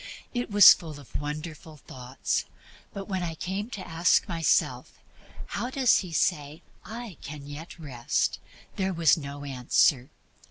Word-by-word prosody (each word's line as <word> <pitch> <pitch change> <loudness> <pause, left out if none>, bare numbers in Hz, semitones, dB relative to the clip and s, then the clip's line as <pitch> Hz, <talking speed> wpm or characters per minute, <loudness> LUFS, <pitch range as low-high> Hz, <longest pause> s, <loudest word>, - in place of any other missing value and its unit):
It 245 -1 -2
was 205 -1 +10
full 155 -4 -9
of 140 - -16
beautiful 150 +1 -6
thoughts; 125 0 -3 0.5
but 195 -1 -7
when 190 -3 -2
I 165 -2 -3
came 195 +7 -4
to 200 -6 -7
ask 165 +2 +2
myself, 165 -3 0 0.5
"How 245 - -4
does 260 -2 +3
he 180 -4 -6
say 150 -1 -1 0.2
I 225 -6 -8
can 145 0 -8
get 145 +5 -9
Rest?" 130 -7 -2 0.4
there 190 -1 0
was 165 -2 +4
no 145 -2 -7
answer. 130 0 +2
160 Hz, 145 wpm, -27 LUFS, 145-190 Hz, 0.5 s, was